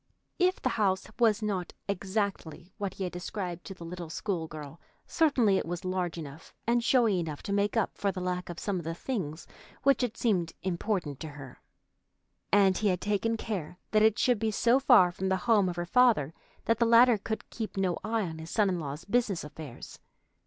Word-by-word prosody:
If 365 +1 +3
the 255 - 0
house 190 -2 +2
was 225 -2 +3
not 190 -4 -2
exactly 190 -3 -3
what 200 -2 -3
he 195 - -4
had 180 - -3
described 180 -1 -5
to 195 - -7
the 170 - -10
little 175 -1 -7
school 170 -1 -3
girl, 150 0 -9 0.2
certainly 255 -11 +3
it - - -4
was 175 +1 -4
large 185 -2 -2
enough 155 -1 -9
and 235 0 +2
showy 230 -7 +3
enough 155 -4 -5
to 200 - -3
make 205 +3 +1
up 225 - +1
for 200 - +1
the 185 - -6
lack 180 0 -3
of 175 - -6
some 195 -2 -2
of - - -7
the 165 +1 -4
things 170 - -4 0.4
which 275 0 +4
had 235 -2 -2
seemed 180 -8 +1
important 180 -5 -2
to 160 - -6
her; 145 -4 -11 0.9
and 195 -2 +4
he 215 - +1
had 180 -3 +1
taken 210 +3 0
care 185 -7 -4
that 215 - +4
it 220 -1 +4
should 245 -4 +2
be 220 - 0
so 235 +4 +3
far 240 -10 +6
from 190 +2 -3
the 190 - +2
home 210 -5 +4
of 175 - -4
her 175 0 -3
father 220 - +3 0.3
that 230 -1 +2
the 235 - +4
latter 235 -1 +6
could 220 +2 -4
keep 220 -3 -5
no 185 -3 0
eye 220 0 0
on 160 -3 -5
his 160 +1 -8
son 210 0 +2
in 180 -2 -1
law's 150 +2 -6
business 205 -5 0
affairs. 150 -4 -10
190 Hz, 210 wpm, -29 LUFS, 170-220 Hz, 0.9 s, far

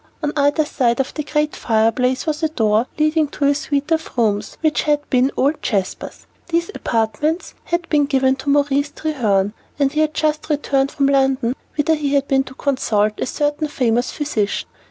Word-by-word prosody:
On 295 0 0
either 290 +1 +2
side 240 -4 0
of 270 - -1
the 305 - -3
great 300 0 -1
fireplace 235 +3 +1
was 310 -1 -2
a 315 - +1
door 220 -4 +1
leading 310 0 +2
to 285 0 -3
a 285 - +4
suite 285 +1 -2
of 320 -4 -1
rooms 210 -3 0
which 310 -2 +2
had 295 -1 0
been 255 0 +3
old 285 +4 +2
Sir - - -32
Jasper's. 195 -4 -3 0.2
These 340 +2 -1
apartments 235 - -1
had 345 0 -1
been 295 -2 +3
given 265 -1 +2
to 275 - -4
Maurice 285 0 +2
Treherne, 220 -11 0 0.2
and 280 -2 +2
he 305 - -2
had 310 0 +1
just 305 0 0
returned 280 -2 +1
from 280 -1 0
London, 270 -3 +2 0.2
whither 300 +2 +2
he 290 -2 0
had 280 0 +1
been 270 -1 +2
to 260 - -11
consult 215 -7 0
a - - -1
certain 295 +2 -1
famous 245 -4 0
physician. 235 -9 -2
280 Hz, 190 wpm, -20 LUFS, 250-300 Hz, 0.2 s, a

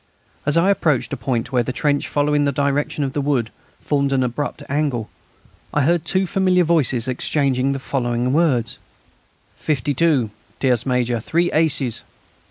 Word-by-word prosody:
As 150 - +3
I 185 +4 +4
approached 155 -9 0
a - - +1
point 120 -1 -2
where 125 -2 +2
the 120 - -3
trench, 145 +2 0
following 145 0 +1
the 140 - +2
direction 140 +2 -1
of 135 -1 -3
the 145 - -1
wood, 135 -6 0 0.3
formed 140 -2 0
an 135 -1 +2
abrupt 145 +4 -3
angle, 140 -6 -1 0.6
I 145 - +3
heard 170 +2 +1
two 190 +3 +1
familiar 185 -1 +2
voices 135 -8 +1
exchanging 135 0 0
the - - -3
following 125 -2 -1
words: 135 -8 +1 0.8
"Fifty 145 -1 -1
two!... 135 -7 +2 0.3
Tierce 125 -2 +1
major...; 125 -2 0
three 170 +9 0
aces!" 140 -7 +1
140 Hz, 160 wpm, -20 LUFS, 125-150 Hz, 0.8 s, I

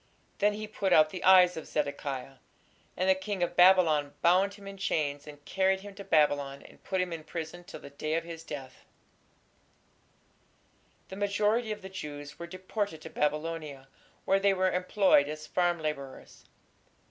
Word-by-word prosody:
Then 205 +1 +3
he 215 +1 -5
put 205 -3 -2
out 155 0 +6
the 185 - -6
eyes 180 -1 +7
of 160 - -7
Zedekiah; 140 -2 -3 0.6
and 185 - 0
the 190 - +6
king 190 0 -3
of 175 0 -2
Babylon 170 -6 +5
bound 190 +4 +4
him 200 -1 -14
in 195 0 -8
chains 145 -6 -2
and 145 -1 -12
carried 190 +4 +1
him 205 0 -10
to 200 0 -9
Babylon 145 -5 +1
and - - -17
put 190 - -2
him 180 -1 -1
in 160 -1 -6
prison 165 +2 -6
till 175 - -10
the 140 - -11
day 155 +2 -3
of 165 - -1
his 165 -1 -8
death. 140 -5 -9 2.3
The 190 - -7
majority 210 +3 +1
of 210 -2 -6
the - - -6
Jews 145 -5 -8
were 170 - -6
deported 185 0 -4
to 160 - -9
Babylonia, 150 -2 -3 0.4
where 195 0 +3
they 195 0 +3
were 185 0 +2
employed 180 -5 +3
as 155 0 -6
farm 175 -1 0
labourers. 145 -4 -6
175 Hz, 170 wpm, -29 LUFS, 150-190 Hz, 2.3 s, eyes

